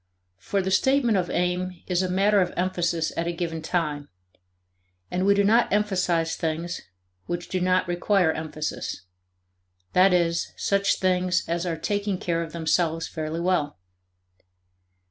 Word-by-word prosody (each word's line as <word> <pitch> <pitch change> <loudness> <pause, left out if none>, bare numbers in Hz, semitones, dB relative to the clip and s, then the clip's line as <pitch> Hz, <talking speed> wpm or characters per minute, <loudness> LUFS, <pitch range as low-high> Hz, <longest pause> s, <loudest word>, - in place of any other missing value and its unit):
For 195 - -1
the 190 - -2
statement 255 +2 +3
of 180 -2 0
aim 180 0 -1
is 180 -1 0
a 185 - -1
matter 200 +2 +3
of 180 - 0
emphasis 175 -2 0
at 170 - -1
a - - 0
given 165 -1 -4
time. 155 -4 -2 1.0
And 185 +2 0
we 200 - +5
do 200 - +3
not 225 +4 +3
emphasize 180 -5 +1
things 165 +2 -3 0.5
which 175 0 -4
do 185 - -1
not 185 0 +2
require 175 0 +2
emphasis 155 -1 -4 0.9
that 185 +1 +6
is, 170 -1 +1
such 200 0 +2
things 180 -1 +1
as 170 +1 -1
are 165 -2 -2
taking 205 +2 -1
care 170 -2 -1
of 165 -2 -5
themselves 165 0 0
fairly 160 +1 -4
well. 175 -5 0
180 Hz, 145 wpm, -25 LUFS, 165-190 Hz, 1.0 s, that